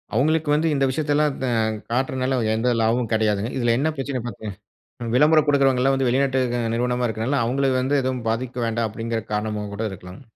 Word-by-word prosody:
அவங்களுக்கு 155 Hz, +4 st, +2 dB
வந்து 155 Hz, +2 st, +1 dB
இந்த 135 Hz, -, +1 dB
விஷயத்தை 145 Hz, +2 st, -1 dB
எல்லாம் 150 Hz, -1 st, +2 dB
த 130 Hz, -, 0 dB, 0.4 s
காட்டுறனால 130 Hz, +1 st, 0 dB, 0.2 s
எந்த 115 Hz, +3 st, +1 dB
லாபமும் 115 Hz, +1 st, +1 dB
கிடையாதுங்க. 110 Hz, 0 st, +1 dB
இதுல 120 Hz, -2 st, +2 dB
என்ன 150 Hz, +5 st, +1 dB
பிரச்சனைனு 135 Hz, -3 st, -4 dB
பாத்தீங்கன்னா, 105 Hz, -3 st, -8 dB, 0.5 s
விளம்பரம் 150 Hz, +2 st, +4 dB
கொடுக்கறவங்க 135 Hz, -3 st, +3 dB
எல்லாம் 135 Hz, +1 st, +3 dB
வந்து 135 Hz, -1 st, 0 dB
வெளிநாட்டு 130 Hz, +1 st, +1 dB
க 120 Hz, -, 0 dB
நிறுவனமா 125 Hz, +1 st, 0 dB
இருக்குறனால, 115 Hz, +5 st, -1 dB
அவங்களுக்கு 130 Hz, +1 st, +1 dB
வந்து 140 Hz, +2 st, +1 dB
எதுவும் 130 Hz, -2 st, -2 dB
பாதிக்க 125 Hz, +2 st, -3 dB
வேண்டாம் 115 Hz, 0 st, -1 dB
அப்படிங்கிற 115 Hz, +1 st, -3 dB
காரணமா 105 Hz, 0 st, -2 dB
கூட 100 Hz, -, -5 dB
இருக்கலாம். 90 Hz, +3 st, -10 dB
125 Hz, 180 wpm, -23 LUFS, 115-135 Hz, 0.5 s, விளம்பரம்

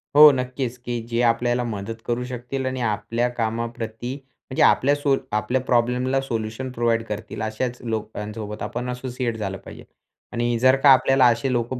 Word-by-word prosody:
हो. 150 Hz, 0 st, +10 dB
नक्कीच 125 Hz, -1 st, -3 dB
की 120 Hz, -1 st, -4 dB
जे 120 Hz, 0 st, 0 dB
आपल्याला 120 Hz, +1 st, +2 dB
मदत 115 Hz, 0 st, -5 dB
करू 120 Hz, +1 st, -1 dB
शकतील 125 Hz, +2 st, -4 dB
आणि 130 Hz, -1 st, -2 dB
आपल्या 115 Hz, +2 st, 0 dB
कामाप्रती 115 Hz, 0 st, -3 dB, 0.4 s
म्हणजे 130 Hz, -, -1 dB
आपल्या 140 Hz, +2 st, +4 dB
सो 145 Hz, -1 st, +2 dB, 0.2 s
आपल्या 120 Hz, +4 st, 0 dB
प्रॉब्लेमला 125 Hz, +1 st, +1 dB
सोल्युशन 115 Hz, 0 st, -4 dB
प्रोव्हाईड 115 Hz, -2 st, +1 dB
करतील 105 Hz, 0 st, -6 dB
अशाच 115 Hz, +3 st, -2 dB
लोकांसोबत 105 Hz, -2 st, -5 dB
आपण 125 Hz, +1 st, -4 dB
असोसिएट 125 Hz, -2 st, -3 dB
झालं 95 Hz, -2 st, -3 dB
पाहिजे. -, -, -12 dB, 0.5 s
आणि 120 Hz, 0 st, 0 dB
जर 130 Hz, +1 st, +5 dB
का 145 Hz, -, +8 dB
आपल्याला 135 Hz, 0 st, +4 dB
असे 120 Hz, +2 st, +3 dB
लोकं 120 Hz, +1 st, -1 dB
120 Hz, 160 wpm, -23 LUFS, 115-130 Hz, 0.5 s, हो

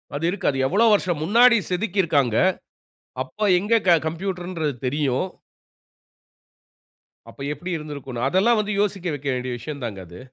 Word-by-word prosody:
அது 150 Hz, +3 st, -2 dB
இருக்கு. 185 Hz, +1 st, -2 dB
அது 135 Hz, -, -5 dB
எவ்வளவு 215 Hz, +7 st, +4 dB
வருஷம் 175 Hz, -6 st, 0 dB
முன்னாடி 235 Hz, +6 st, +6 dB
செதுக்கி 190 Hz, +2 st, 0 dB
இருக்காங்க 140 Hz, -8 st, +1 dB, 0.9 s
அப்போ 210 Hz, +11 st, -4 dB
எங்க 220 Hz, +4 st, +2 dB, 0.3 s
கம்ப்யூட்டர்ங்குறது 175 Hz, -2 st, -3 dB
தெரியும்? 140 Hz, +1 st, 0 dB, 2.0 s
அப்போ -, -, -13 dB
எப்படி 175 Hz, +5 st, -8 dB
இருந்துருக்கும்னு, 140 Hz, -5 st, -5 dB
அதெல்லாம் 215 Hz, +7 st, +3 dB
வந்து 210 Hz, 0 st, -1 dB
யோசிக்க 195 Hz, -3 st, -2 dB
வைக்க 140 Hz, 0 st, -7 dB
வேண்டிய 125 Hz, 0 st, -4 dB
விஷயம்தாங்க 120 Hz, -6 st, -6 dB
அது. 90 Hz, +2 st, -12 dB
170 Hz, 130 wpm, -23 LUFS, 140-200 Hz, 2.0 s, முன்னாடி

